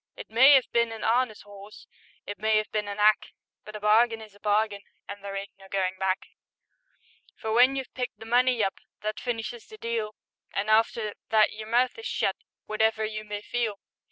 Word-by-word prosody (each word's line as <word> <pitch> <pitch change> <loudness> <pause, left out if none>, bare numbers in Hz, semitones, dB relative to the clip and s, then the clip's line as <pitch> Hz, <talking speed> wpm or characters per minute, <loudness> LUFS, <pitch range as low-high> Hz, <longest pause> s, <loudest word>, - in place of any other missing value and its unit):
It - - -10
may 265 +5 +8
'ave 260 - +1
been 235 -1 +2
an' 225 -1 -7
'arness 230 -1 +1
'orse, 205 +1 -13 0.4
It 205 - -6
may 215 0 +3
'ave 215 - -4
been 210 -1 -1
an 200 - -5
'ack, 210 +1 +3 0.3
But 215 - -10
a - - -5
bargain 225 +2 +4
is 215 -2 -12
a 205 - -20
bargain, 210 0 +1 0.3
An' 200 0 -8
there 200 0 -6
ain't 195 0 -5
no 195 - -14
goin' 190 -1 0
back; 190 0 0 1.1
For 220 - -4
when 250 +3 +5
you've 265 -2 -5
picked 250 -1 -4
the 225 - -11
money 245 0 +3
up, 195 - -2 0.2
That 215 0 -3
finishes 230 -1 -4
the 435 - -12
deal, 230 - -3 0.4
And 205 +2 0
after 220 -1 +2 0.2
that 215 -1 +4
your 215 0 -8
mouth 245 - +1
is 450 - -5
shut, - - 0 0.3
Wotever 220 0 +1
you 215 0 -5
may 210 -1 -6
feel. 225 -4 -2
215 Hz, 200 wpm, -27 LUFS, 205-235 Hz, 1.1 s, may